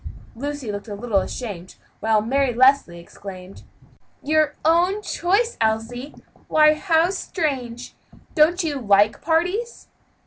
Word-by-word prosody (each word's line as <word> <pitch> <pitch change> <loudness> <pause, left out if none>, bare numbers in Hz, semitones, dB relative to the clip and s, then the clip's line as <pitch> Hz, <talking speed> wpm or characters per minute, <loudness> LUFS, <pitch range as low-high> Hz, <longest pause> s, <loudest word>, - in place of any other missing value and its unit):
Lucy 280 -2 -5
looked 205 +2 -7
a 205 - -6
little 210 -1 0
ashamed, 190 -4 -6 0.2
while 220 -1 +2
Mary 265 +1 0
Leslie 260 -8 +4
exclaimed: 185 +2 -11 0.6
"Your 305 0 +1
own 355 +6 +2
choice, 405 +6 0
Elsie? 225 +5 -2 0.3
why, 305 0 +5
how 330 +2 +2
strange! 270 -11 -4 0.4
don't 340 +4 +3
you 295 -4 -2
like 205 -2 +3
parties?" 360 +9 -1
275 Hz, 115 wpm, -22 LUFS, 220-325 Hz, 0.6 s, why